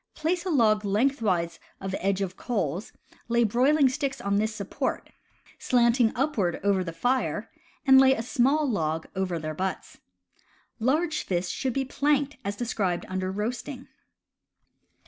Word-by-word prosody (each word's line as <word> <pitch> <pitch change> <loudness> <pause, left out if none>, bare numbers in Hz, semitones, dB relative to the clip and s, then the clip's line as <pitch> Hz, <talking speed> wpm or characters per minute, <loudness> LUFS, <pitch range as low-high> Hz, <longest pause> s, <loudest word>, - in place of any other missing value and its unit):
Place 340 +3 -1
a - - 0
log 220 -8 +3
lengthwise 205 -5 0 0.2
of 190 0 -5
edge 195 0 0
of 190 -1 -3
coals, 195 - -2 0.4
lay 235 0 +3
broiling 265 +6 +4
sticks 270 0 -2
on 200 -3 0
this 215 +1 0
support, 220 +7 -3 0.5
slanting 235 -1 +3
upward 240 - 0
over 200 -2 +2
the 170 - -5
fire, 245 +10 -1 0.3
and 265 -1 +8
lay 265 0 +5
a 225 - -3
small 275 +5 +2
log 160 - -1
over 185 -2 -1
their 155 -1 -4
butts. 185 +4 -4 0.8
Large 305 +7 +1
fish 180 -1 -2
should 260 -4 -2
be 270 +1 -1
planked 285 +1 0
as 200 +1 -3
described 200 -7 -1
under 185 0 -2
Roasting. 240 +6 -4
230 Hz, 145 wpm, -27 LUFS, 190-265 Hz, 0.8 s, and